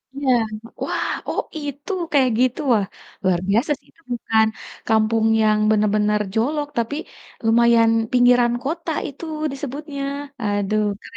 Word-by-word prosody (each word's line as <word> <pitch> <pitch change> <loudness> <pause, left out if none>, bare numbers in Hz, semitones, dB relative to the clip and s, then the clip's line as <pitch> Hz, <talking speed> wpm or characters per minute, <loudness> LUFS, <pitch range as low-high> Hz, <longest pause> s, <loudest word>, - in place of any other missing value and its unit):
Iya, 275 -2 +1 0.5
wah, - - -1 0.2
oh - - 0 0.2
itu 290 +4 -6 0.2
kayak 270 -3 +4
gitu, 255 +2 +2
wah 205 -3 +2 0.4
luar 185 -2 +2
biasa 225 +8 +2
sih, - - -31
itu - - -28
bukan 220 -2 +2 0.4
kampung 220 0 +2 0.2
yang 215 -1 +3
benar-benar 210 0 +2
jolok, 290 +7 0
tapi 235 +4 -1 0.5
lumayan 230 0 +5 0.2
pinggiran 245 -1 +4
kota 325 +4 -3 0.2
itu 285 +4 -8 0.3
disebutnya, 280 +1 -5 0.4
aduh, 205 +1 0 0.2
keren - - -12
235 Hz, 130 wpm, -21 LUFS, 215-280 Hz, 0.5 s, lumayan